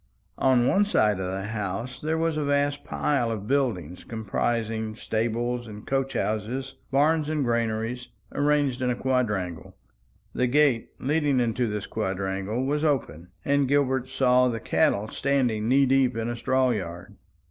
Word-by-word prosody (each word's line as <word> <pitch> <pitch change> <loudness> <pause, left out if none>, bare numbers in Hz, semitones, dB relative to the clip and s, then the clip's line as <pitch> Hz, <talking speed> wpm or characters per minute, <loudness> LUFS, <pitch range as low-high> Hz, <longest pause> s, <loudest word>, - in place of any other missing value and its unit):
On 130 -2 +4
one 195 +10 +4
side 105 - +2
of 90 -1 -2
the 95 +2 -4
house 110 +4 -4
there 160 +1 0
was 165 -1 0
a 155 - -1
vast 145 0 0
pile 135 -6 0
of 110 -3 -4
building, 110 - 0
comprising 110 0 -2
stables 120 +2 -2
and 105 -1 -10
coach 135 0 -1
houses, 120 +6 -2 0.2
barns 150 +2 +2
and 155 -2 0
granaries, 115 +1 -1 0.3
arranged 145 -3 +1
in 125 - +1
a 125 - +1
quadrangle. 105 -10 -2 0.6
The 125 - +1
gate 130 -3 +3
leading 145 -1 +1
into 120 0 0
this 105 -1 -3
quadrangle 95 +3 -2
was 145 +2 0
open, 100 - -1 0.2
and 140 -1 +2
Gilbert 130 -2 +1
saw 125 -1 +3
the 115 -2 -2
cattle 105 -1 +1
standing 125 -6 0
knee 135 +2 +5
deep 130 -3 +2
in 115 +1 -2
a 120 - -2
straw 130 +2 +2
yard. 90 -5 -5
125 Hz, 155 wpm, -26 LUFS, 110-135 Hz, 0.6 s, knee